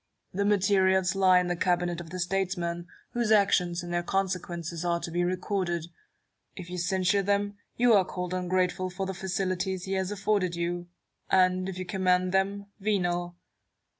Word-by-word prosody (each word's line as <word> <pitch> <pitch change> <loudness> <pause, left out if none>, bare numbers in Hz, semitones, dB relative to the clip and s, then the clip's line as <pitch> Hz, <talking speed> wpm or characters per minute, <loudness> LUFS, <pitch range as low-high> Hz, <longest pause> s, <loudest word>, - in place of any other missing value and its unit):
The 200 +2 0
materials 190 -2 +3
lie 190 -2 +5
in 180 - 0
the 175 0 -1
cabinet 175 -1 0
of 165 - -10
the 185 - -6
statesman, 175 -2 -2 0.2
whose 235 -2 0
actions 180 -4 +3
and 175 0 -5
their 175 - +1
consequences 175 -3 -2
are 170 -1 +1
to 170 - -6
be 175 +1 0
recorded. 180 -2 -1 0.7
If 180 -2 -9
you 180 - -3
censure 190 +2 +2
them, 205 +1 0 0.2
you 240 -1 +5
are 200 -3 +6
called 180 -1 -5
ungrateful 185 0 0
for 190 +2 -4
the 190 - -3
facilities 185 0 -2
he 190 - -3
has 190 0 -1
aflforded 200 -3 0
you; 175 +1 -3 0.4
and, 185 0 +3
if 185 - -6
you 185 - -4
commend 185 0 +1
them, 200 +1 0
venal. 175 -4 -1
185 Hz, 165 wpm, -28 LUFS, 175-195 Hz, 0.7 s, are